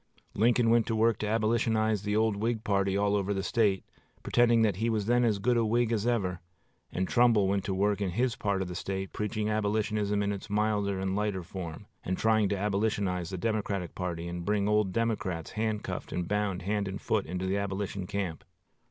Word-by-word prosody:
Lincoln 115 +1 +3
went 115 -1 +3
to 115 - 0
work 115 +1 +2
to 105 - -2
Abolitionize 110 -1 +1
the 105 0 -1
old 110 -1 +2
Whig 110 +2 -1
party 100 -2 +1
all 100 0 +2
over 100 0 0
the 95 - -2
State, 100 -2 +1 0.4
pretending 120 -1 +4
that 105 -5 +1
he 115 +3 0
was 110 -3 0
then 120 +2 +3
as 110 -4 +2
good 120 +4 +1
a 115 - +3
Whig 115 +1 +1
as 110 0 0
ever; 95 -7 0 0.5
and 95 0 -1
Trumbull 120 -5 +4
went 100 0 0
to 95 - -1
work 100 +1 +1
in 100 - 0
his 120 +6 0
part 100 -2 -1
of - - -6
the 90 - -6
State 95 +2 -4
preaching 105 0 -2
Abolitionism 105 -1 0
in 100 0 0
its 100 +2 -8
milder 105 -2 0
and 95 0 -1
lighter 105 -3 -1
form, 85 +1 -7 0.2
and 95 0 -2
trying 110 -2 +3
to - - 0
Abolitionize 100 -3 -1
the 95 - -4
Democratic 100 -3 -2
party 85 -2 -4
and 85 0 -5
bring 100 +1 +1
old 105 -2 +2
Democrats 105 -7 -2
handcuffed 110 -1 -3
and 90 -1 -2
bound 100 -3 -1
hand 100 +1 -1
and 95 +1 -4
foot - - -1
into 90 +2 -3
the 95 +2 0
Abolition 100 -1 -3
camp. 95 -5 -3
105 Hz, 205 wpm, -29 LUFS, 95-110 Hz, 0.5 s, pretending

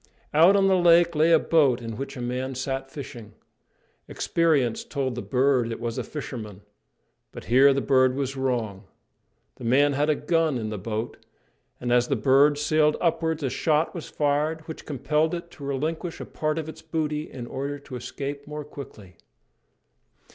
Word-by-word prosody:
Out 170 +6 +6
on 195 -1 +4
the 190 - +4
lake 170 -1 +5
lay 155 +2 +3
a 165 - +8
boat 145 -6 +3
in 115 -2 -6
which 135 +3 -6
a - - -5
man 130 +2 -3
sat 135 +1 -3
fishing. 120 -6 -9 0.7
Experience 150 -9 +1
told 135 -3 -3
the 125 - -4
bird 125 -2 +1
it 115 - -5
was 115 -1 -3
a - - -2
fisherman, 110 -9 -7 0.7
but - - -9
here 135 +4 +5
the 135 0 +1
bird 130 -2 +3
was 135 -1 -2
wrong. 115 -7 -2 0.7
The - - -11
man 140 +5 +3
had 145 +3 +1
a 155 - +3
gun 160 -1 +1
in 110 -2 -3
the 105 -2 -5
boat, 110 +4 -4 0.6
and 120 0 -1
as 120 0 +3
the 140 - +1
bird 135 +5 +4
sailed 150 0 +2
upwards 160 -2 0
a 135 - 0
shot 155 0 +1
was 170 - -7
fired 150 +2 0
which 160 0 -10
compelled 150 +3 0
it 170 0 -8
to 145 - -12
relinquish 155 +5 -3
a - - -6
part 155 0 -2
of 160 -1 -3
its 160 0 -9
booty 155 -1 -3
in 125 -2 -7
order 140 +3 -4
to 140 -2 -10
escape 140 +3 -6
more 150 0 -6
quickly. 105 - -11
140 Hz, 180 wpm, -25 LUFS, 125-155 Hz, 0.7 s, a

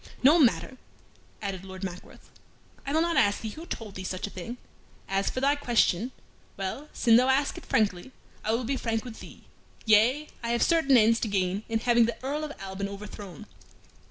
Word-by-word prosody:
"No 300 +6 +7
matter," 260 -1 +2 0.7
added 190 -2 -4
Lord 190 0 -9
Mackworth. 180 -1 -8 0.6
"I - - -1
will 320 +2 +3
not 340 0 0
ask 205 0 +3
thee 220 - -4
who 325 +9 -10
told 220 - -6
thee 190 - -7
such 185 0 -3
a 205 - -7
thing. 230 +7 -7 0.5
As 195 +1 0
for 255 - -4
thy 280 +1 +4
question 240 -4 +1 0.5
well, 195 +10 -4
sin 230 -2 +4
thou 250 +1 +4
ask 270 +2 +2
it - - -10
frankly, 210 +2 0 0.3
I 215 - 0
will 235 +2 0
be 265 +3 -1
frank 225 -2 -2
with 230 -3 -8
thee. - - -12 0.4
Yea, 235 +8 +4
I 235 - -3
have 235 - +2
certain 320 -6 +4
ends 225 0 +4
to - - -1
gain 190 -1 0
in 225 -1 0
having 235 -1 +4
the 235 - -3
Earl 290 +3 -2
of 305 - -4
Alban 195 +1 -5
overthrown." 200 -4 -9
225 Hz, 195 wpm, -27 LUFS, 200-265 Hz, 0.7 s, No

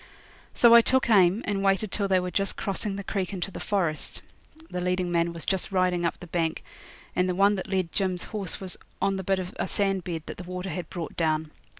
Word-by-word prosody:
So 235 -1 +7
I 235 - +10
took 260 0 +2
aim 195 +1 +5
and 200 -1 -1
waited 195 +1 +2
till 200 -2 0
they 190 -1 +3
were 180 0 -3
just 195 +1 0
crossing 200 0 -2
the 200 - -5
creek 195 -2 -2
into 190 0 -3
the - - -7
forest. 170 -7 -1 0.5
The 180 - -2
leading 180 0 0
man 170 0 +2
was 170 -1 -6
just 190 0 -1
riding 180 -2 +2
up 170 - -1
the 180 - -9
bank, 165 -1 -1 0.5
and 180 0 +2
the 180 - 0
one 200 +2 +5
that 195 0 -4
led 185 -3 0
Jim's 185 -3 -1
horse 200 -5 -4
was 190 -2 -3 0.2
on 195 -1 +1
the 190 - -4
bit 195 +1 +1
of 185 +2 -5
a - - 0
sand 195 -3 0
bed 165 -3 -4
that - - -7
the 180 - -7
water 180 +1 -5
had 170 0 -5
brought 170 -3 -6
down. 155 -2 0
185 Hz, 235 wpm, -27 LUFS, 175-195 Hz, 0.5 s, I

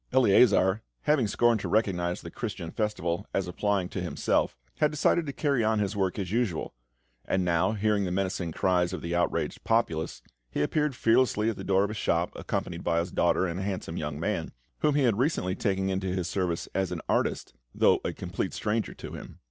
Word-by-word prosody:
Eleazar, 105 -5 +5 0.2
having 150 -7 +3
scorned 120 +2 +3
to - - -4
recognise 90 -5 0
the 85 - -8
Christian 100 -8 -5
Festival 105 -4 -2
as 95 -2 0
applying 95 +1 0
to - - -4
himself, - - 0 0.2
had 150 - +4
decided 155 +2 +2
to - - -2
carry 140 -3 +1
on 110 0 +2
his 105 -1 -1
work 95 -1 0
as 95 -3 -3
usual; 115 -7 -1 0.5
and 95 -1 0
now, 85 +3 +2
hearing 105 -1 +1
the - - -1
menacing 95 -2 -1
cries 90 +1 +1
of 90 - -5
the 85 0 -3
outraged 85 0 -1
populace, 85 -9 0 0.3
he 75 - -1
appeared 150 - 0
fearlessly 115 -2 +3
at - - -7
the - - -7
door 95 0 +3
of 100 - -1
his 110 - -5
shop, 85 -3 +1
accompanied - - -3
by 85 - +1
his 85 +1 -1
daughter, 85 +2 +2
and 85 0 -3
a - - -3
handsome 95 -4 -3
young 75 -3 -4
man, 85 -2 -2 0.3
whom 150 -2 +2
he 145 - +3
had 115 -4 +2
recently 125 - +1
taken 95 -1 0
into 95 0 -1
his 90 -1 -1
service 90 -2 -1
as 95 -2 0
an - - -3
artist, - - 0 0.2
though - - +4
a - - -1
complete - - -4
stranger 110 +1 -1
to - - -8
him. - - -9
95 Hz, 205 wpm, -28 LUFS, 90-110 Hz, 0.5 s, Eleazar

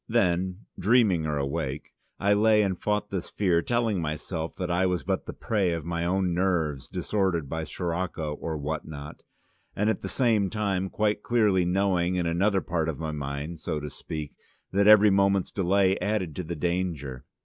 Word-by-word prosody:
Then 95 -3 +1
(dreaming 100 -7 +3
or 75 -1 -1
awake) 70 0 -3 0.3
I 100 +1 +3
lay 105 +1 +4
and 95 -2 0
fought 105 0 -1
this 95 -3 -3
fear, 90 -5 +2
telling 115 -3 0
myself 80 +1 -4
that 90 -1 -3
I 90 +2 +2
was 90 -5 -1
but - - -2
the - - -3
prey 100 -6 0
of 80 -2 -4
my 85 0 -2
own 90 0 +1
nerves 85 -7 0
disordered 95 -7 -1
by 80 +3 -3
Sirocco 85 -2 -3
or 80 +1 -4
what 75 +1 -3
not, 75 -1 -9 0.5
and 105 +2 +2
at - - -4
the - - -4
same 110 -6 +2
time 100 -3 -1
quite 105 +1 0
clearly 105 -7 +2
knowing 90 -1 +1
in 90 -1 0
another 95 +4 +2
part 80 -2 -1
of 75 - -3
my 80 +1 -3
mind, 75 +2 -5
so 75 0 -3
to 75 -1 -6
speak, 75 -2 -6 0.4
that 100 +1 +3
every 105 -1 +8
moment's 100 -1 +2
delay 95 0 +2
added 95 -5 -1
to 90 - -2
the 85 +1 -5
danger. 80 -6 -2
90 Hz, 180 wpm, -27 LUFS, 80-100 Hz, 0.5 s, every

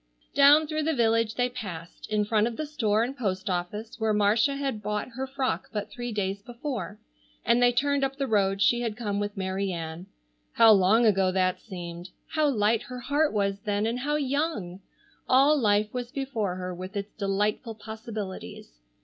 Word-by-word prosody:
Down 285 +2 +7
through 310 0 -2
the 315 0 0
village 230 -2 +2
they 245 0 +2
passed, 185 -9 -8
in 210 -1 +1
front 215 +1 +2
of 235 - -5
the 310 - -2
store 225 -8 +1
and 255 +3 -3
post 195 -5 -2
office 205 +6 -4
where 220 -1 +1
Marcia 215 +7 +3
had 270 -6 -3
bought 210 +3 -3
her 260 +2 -5
frock 265 -1 -2
but 210 -2 -4
three 240 -1 -5
days 200 -2 -2
before, 235 - -5 0.5
and 235 +1 +4
they 245 0 +6
turned 280 +3 +1
up 270 0 -1
the 275 0 -1
road 200 -4 +2
she 240 +3 +3
had 225 -3 -3
come 205 -4 -2
with 205 0 -3
Mary 190 +1 -2
Ann. 165 +1 -6 0.5
How 225 -1 +7
long 210 +4 +5
ago 195 -3 +3
that 185 -1 +1
seemed! 175 -3 -8 0.2
How 310 -2 +2
light 220 -3 +2
her 250 -1 -8
heart 290 +5 +1
was 200 -1 0
then, 205 +1 -1
and 235 +2 -1
how 295 +3 -1
young! 280 - -1 0.5
All 275 +4 +6
life 210 -5 +2
was 245 -1 -4
before 250 -10 -2
her 185 0 -5
with 185 +3 -7
its 200 +1 -5
delightful 210 +3 -1
possibilities. 210 - -8
220 Hz, 185 wpm, -27 LUFS, 195-255 Hz, 0.5 s, Down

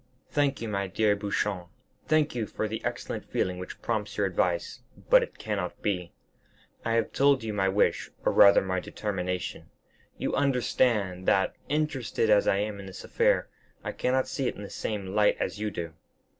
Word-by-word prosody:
"Thank 140 -4 +1
you, - - -3
my 100 -2 -1
dear 105 +2 +2
Beauchamp, 100 -3 -2 0.4
thank 155 -1 +3
you 115 -3 -2
for 110 - -3
the 110 +1 -5
excellent - - -3
feeling 90 -1 -2
which 90 - -8
prompts 110 -3 -2
your 100 - +2
advice; 90 -2 -1 0.3
but - - +8
it - - -5
cannot 100 -5 -3
be. 90 -4 -1 0.7
I 115 - 0
have 115 -1 +1
told 140 -3 +4
you 110 -1 -3
my 95 -2 +2
wish, 100 +2 +1 0.2
or - - +4
rather 100 - +7
my 95 -1 -1
determination. 90 -2 -4 0.5
You - - -2
understand 120 -8 +1
that, 95 - +3
interested 135 -7 0
as 105 -1 +5
I 95 - +4
am 105 0 -2
in 100 - -8
this 95 - -9
affair, - - +2 0.4
I - - -3
cannot 130 +1 0
see 135 -3 -2
it - - -2
in 105 - -8
the 100 - -8
same 105 -3 -3
light 105 0 +4
as - - -2
you 105 0 -1
do. 85 -4 -5
105 Hz, 185 wpm, -28 LUFS, 95-115 Hz, 0.7 s, but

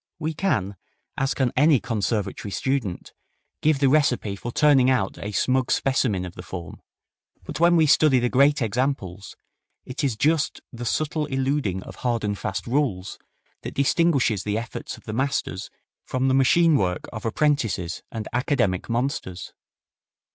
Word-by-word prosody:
We 160 0 -3
can, 105 - -1 0.4
as 135 0 0
can 130 -3 +1
any 145 0 +5
conservatory 105 -3 -2
student, 130 -5 -2 0.5
give 155 -1 +3
the 135 0 +3
recipe 130 -8 +2
for 120 +4 -6
turning 135 -2 +4
out 125 -7 0
a 105 - -5
smug 130 +4 +1
specimen 120 -9 +1
of 90 - -8
the 90 - -9
form, 90 -1 -8 0.6
but - - -6
when 170 +1 +5
we 160 -2 +5
study 150 -2 +5
the 125 0 +2
great 140 +2 +3
examples, 110 -5 -2 0.5
it 130 +4 -5
is 130 -6 0
just 155 +4 +1
the 120 0 -6
subtle 155 +4 -1
eluding 135 -8 -1
of - - -11
hard 120 -3 -1
and 105 -1 -1
fast 100 -2 -3
rules 120 -8 -1 0.4
that - - -7
distinguishes 140 - +2
the 105 0 -1
efforts 115 0 -6
of - - -17
the 110 - -6
masters 130 -7 -2 0.4
from 130 +1 0
the - - +2
machine 155 +4 +4
work 90 -2 -1
of 110 - -6
apprentices 115 - 0
and 110 -2 -5
academic 120 - 0
monsters. 115 -7 -3
125 Hz, 155 wpm, -24 LUFS, 105-140 Hz, 0.6 s, any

